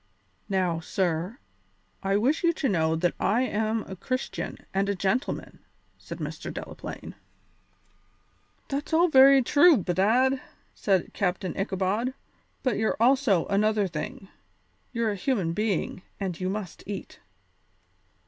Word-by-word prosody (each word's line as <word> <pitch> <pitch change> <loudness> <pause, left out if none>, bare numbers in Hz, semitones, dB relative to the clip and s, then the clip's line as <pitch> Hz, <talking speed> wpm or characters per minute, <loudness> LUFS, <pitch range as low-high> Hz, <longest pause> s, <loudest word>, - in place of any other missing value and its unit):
"Now, 185 -4 +1
sir, 175 +4 -1 0.6
I 195 +1 +1
wish 265 +11 +1
you 340 0 +4
to 300 - -1
know 160 -6 +2
that 175 +2 +1
I 225 +6 +2
am 220 -2 0
a 190 - -8
Christian 255 +7 -3 0.2
and 195 +1 +1
a 200 - +1
gentleman," 195 +8 -2 0.4
said - - -8
Mr. - - -5
Delaplaine. - - -7 1.5
"That's 280 +3 -4
all 345 +2 +5
very 270 -1 +7
true, 295 +5 +6
bedad," 225 +9 +2 0.3
said 190 -4 0
Captain 185 -1 -1
Ichabod, 195 +6 -1 0.5
"but 255 - +1
you're 220 - +1
also 240 - +4
another 210 0 +2
thing; 190 +2 -6 0.6
you're 230 -3 0
a - - -2
human 190 -5 0
being, 205 -2 -1 0.2
and 190 -4 -3
you 185 0 -1
must 195 -3 -5
eat." 200 -1 -6
205 Hz, 130 wpm, -27 LUFS, 190-255 Hz, 1.5 s, very